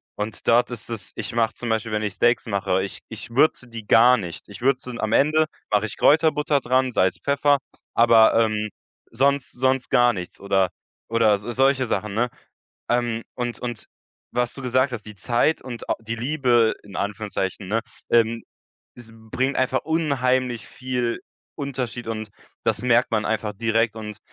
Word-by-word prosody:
und 105 +1 -5
dort 120 +1 +4
ist 120 -2 -8
es 115 -3 -6
ich - - -5
mache 115 -1 +1
zum 120 - -6
Beispiel, 110 0 -1
wenn 105 0 -1
ich 105 -3 -2
Steaks 120 +5 +2
mache, 95 -3 0
ich 95 - -6
ich 110 +1 -8
würze 135 0 +2
die 115 -2 -9
gar 125 +2 +6
nicht. 90 -6 -7
Ich 100 +3 -11
würze 130 -1 0
am 110 0 -1
Ende, 155 +4 +4 0.3
mache 105 0 +2
ich - - -8
Kräuterbutter 150 -1 +3
dran, 130 0 +1
Salz, 95 -5 +1
Pfeffer, 140 0 +3 0.4
aber, 115 -1 +6
ähm, 110 -1 +1 0.4
sonst 140 +3 +1
sonst 130 +1 0
gar 120 0 +4
nichts 90 -4 -7
oder 95 -2 +1 0.4
oder 115 -2 +4
s 100 - -1
so 120 - -5
solche 135 +1 +2
Sachen, 105 0 -2
ne? 120 +4 +1 0.6
Ähm, 120 -2 0
und 120 -1 -3
und 120 -4 -5 0.5
was 120 0 0
du 135 - -8
gesagt 130 +1 +1
hast, 110 -4 -6
die 105 -1 -10
Zeit 120 +9 +1
und 120 -3 -8
au - - +2
die 115 +1 -4
Liebe 120 -2 +2
in 100 -1 -12
Anführungszeichen, 100 -2 -3
ne? 110 +4 0 0.3
Ähm, 115 0 +3 0.5
es 120 -2 -13
bringt 115 +5 -2
einfach 130 0 +1
unheimlich 130 -7 0
viel 125 +1 -3 0.4
Unterschied 125 -5 -4
und 110 -1 -4 0.4
das - - 0
merkt 125 0 +3
man 110 -1 +1
einfach 110 -1 -1
direkt 115 +1 +1
und 105 -1 -7
120 Hz, 175 wpm, -23 LUFS, 110-130 Hz, 0.6 s, gar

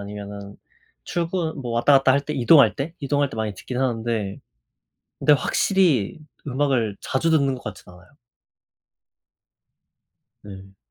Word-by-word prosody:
아니면은 100 0 -8 0.5
출근 170 - -3
뭐 120 -3 -5
왔다 120 +5 +3
갔다 135 -1 +3
할때 140 +2 -1
이동할 140 +2 +5
때, 150 +4 -4
이동할 145 0 0
때 110 - -10
많이 110 -2 -2
듣긴 125 +6 -6
하는데 115 -5 -2 0.8
근데 150 - +4
확실히 160 - +1 0.3
음악을 130 -6 0
자주 165 +5 -1
듣는 140 -4 +2
것 125 - -10
같진 90 -3 -9
않아요. 90 +1 -17 2.4
음. 95 -1 -12
130 Hz, 260 characters per minute, -23 LUFS, 105-145 Hz, 2.4 s, 이동할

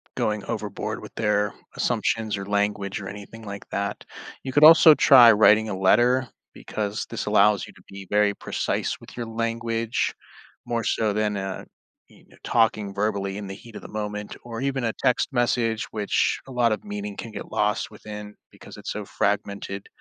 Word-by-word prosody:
going 105 -1 -1
overboard 105 -3 -4
with - - -11
their 105 -1 +1 0.2
assumptions 110 -2 0
or 100 - -5
language 100 -1 -1
or 95 - -7
anything 105 +2 -10
like 100 -1 -8
that. 100 +1 -3 0.4
You 130 -1 -5
could 145 - +4
also 160 0 +10
try 120 -4 +8
writing 110 +1 +5
a 95 - -3
letter 120 +6 +3 0.2
because 105 0 -4
this 115 - -4
allows 105 -1 +3
you - - -14
to - - -19
be 95 -1 -10
very 105 0 +3
precise - - -2
with - - -14
your 120 - -3
language 115 0 -2 0.5
more 120 -1 -2
so 110 -2 +1
than, 105 0 0
uh, 95 -1 -5 0.4
you - - -21
kn - - -20
talking 110 -4 +1
verbally 100 -1 -1
in 100 -2 -6
the 95 - -6
heat 115 +1 -14
of - - -7
the - - -10
moment 105 0 -6
or 115 0 -6
even 135 -2 -1
a 115 - 0
text 130 0 +2
message, 120 -2 +1
which 105 -2 0
a - - -10
lot 120 -2 +2
of 110 - -2
meaning 205 0 -5
can 115 - -7
get - - -8
lost 105 +1 0
within 105 -1 -9 0.2
because - - -13
it's - - -6
so - - -5
fragmented. 100 -1 -2
105 Hz, 185 wpm, -24 LUFS, 100-115 Hz, 0.5 s, also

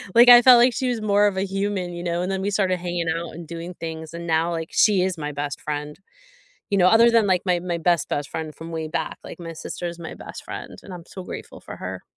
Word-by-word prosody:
Like 240 +1 +8
I 240 0 +11
felt 250 0 +8
like 245 0 +5
she 255 +3 -1
was 240 -3 -2
more 205 -1 +3
of 190 -2 -2
a - - +1
human, 195 -2 -2
you 175 0 -6
know? 175 0 -1
And 185 +2 -2
then 190 - -2
we 200 +1 -1
started 190 -2 +1
hanging 175 -1 -3
out 165 +1 -3
and 165 -1 -10
doing 170 +1 -7
things, 160 -1 -7
and 170 0 -7
now 165 +1 +1
like 165 -1 -4
she 205 -4 +4
is 185 -1 -1
my 150 -1 -4
best 145 -1 -4
friend. 150 +2 -5 0.7
You 200 - +2
know, 180 -1 +6
other 230 +3 +6
than 230 -2 +4
like 185 -2 +2
my 175 -1 +2
my 175 -1 -3
best 170 -3 +1
best 145 -1 -2
friend 160 -2 -5
from 165 +1 -9
way 160 -1 -4
back, 165 - -3
like - - -10
my 165 -1 -7
sister 170 +2 -6
is 170 0 -6
my 165 - -7
best - - -10
friend - - -8
and 195 - -11
I'm 170 - -10
so 190 - -9
grateful - - -9
for - - -9
her. - - -6
175 Hz, 270 wpm, -23 LUFS, 165-195 Hz, 0.7 s, I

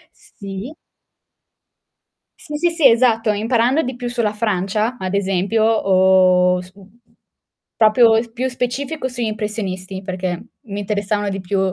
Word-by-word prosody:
S - - -22
sì. 200 +7 -7 1.7
Sì, 300 -4 -7
sì, 345 +3 +2
sì, 330 -5 +5
esatto, 230 -2 +3
imparando 235 +7 +1
di 255 0 -4
più 245 0 -5
sulla 235 -4 -1
Francia, 210 +2 -1
ad 185 -3 -4
esempio, 200 +2 0 0.9
uhm, 180 - -1
su 185 +2 -12
uhm, 200 +4 -19 0.8
proprio 225 +1 +5
e 225 - +2
s 230 - -15
più 255 +2 -2
specifico 260 +4 -3
sugli 245 -2 -4
impressionisti, 200 -3 -4
perché 185 -1 -4 0.2
mi 205 -4 -6
interessavano 205 0 -2
di 195 - -4
più 190 +1 -2
215 Hz, 145 wpm, -19 LUFS, 195-245 Hz, 1.7 s, sì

